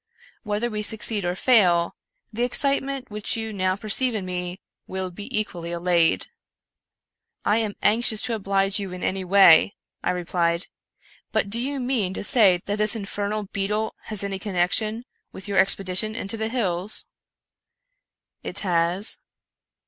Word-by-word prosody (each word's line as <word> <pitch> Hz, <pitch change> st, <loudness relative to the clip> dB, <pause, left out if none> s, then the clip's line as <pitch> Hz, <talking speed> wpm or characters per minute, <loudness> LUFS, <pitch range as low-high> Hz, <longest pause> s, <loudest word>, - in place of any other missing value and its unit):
Whether 210 Hz, +2 st, -2 dB
we 215 Hz, -2 st, -4 dB
succeed 210 Hz, -2 st, +3 dB
or 175 Hz, 0 st, -1 dB
fail, 185 Hz, -7 st, +3 dB, 0.4 s
the 230 Hz, -, -3 dB
excitement 270 Hz, 0 st, 0 dB
which 210 Hz, +1 st, 0 dB
you 220 Hz, -1 st, -5 dB
now 185 Hz, -1 st, 0 dB
perceive 225 Hz, +4 st, +1 dB
in 200 Hz, -3 st, -3 dB
me 180 Hz, 0 st, -5 dB, 0.3 s
will 190 Hz, -1 st, -4 dB
be 205 Hz, +4 st, -8 dB
equally 170 Hz, -5 st, -5 dB
allayed." 170 Hz, -1 st, +1 dB, 0.6 s
" -, -, -51 dB
I -, -, +3 dB
am 215 Hz, -3 st, -2 dB
anxious 220 Hz, 0 st, +3 dB
to 235 Hz, -, -1 dB
oblige 195 Hz, -1 st, +1 dB
you 195 Hz, -2 st, -5 dB
in 180 Hz, -, -7 dB
any 190 Hz, 0 st, -1 dB
way," 190 Hz, -1 st, +6 dB, 0.3 s
I -, -, -1 dB
replied; 175 Hz, -1 st, 0 dB, 0.3 s
" -, -, -31 dB
but 200 Hz, -, 0 dB
do 230 Hz, -, +1 dB
you 275 Hz, +2 st, -3 dB
mean 240 Hz, -7 st, -1 dB
to -, -, -4 dB
say 200 Hz, -5 st, +5 dB
that 205 Hz, +1 st, -3 dB
this 215 Hz, +2 st, +5 dB
infernal 205 Hz, 0 st, -4 dB
beetle 210 Hz, +2 st, -1 dB
has 215 Hz, -2 st, -2 dB
any 195 Hz, -1 st, -4 dB
connection 215 Hz, +4 st, -1 dB, 0.3 s
with 190 Hz, -, -9 dB
your 200 Hz, -2 st, +1 dB
expedition 195 Hz, +3 st, +2 dB
into 220 Hz, 0 st, -2 dB
the 220 Hz, 0 st, -3 dB
hills? 200 Hz, -5 st, -2 dB, 0.5 s
" -, -, -58 dB
" -, -, -65 dB
It -, -, -4 dB
has." 175 Hz, +1 st, +1 dB
200 Hz, 160 wpm, -23 LUFS, 185-220 Hz, 0.6 s, way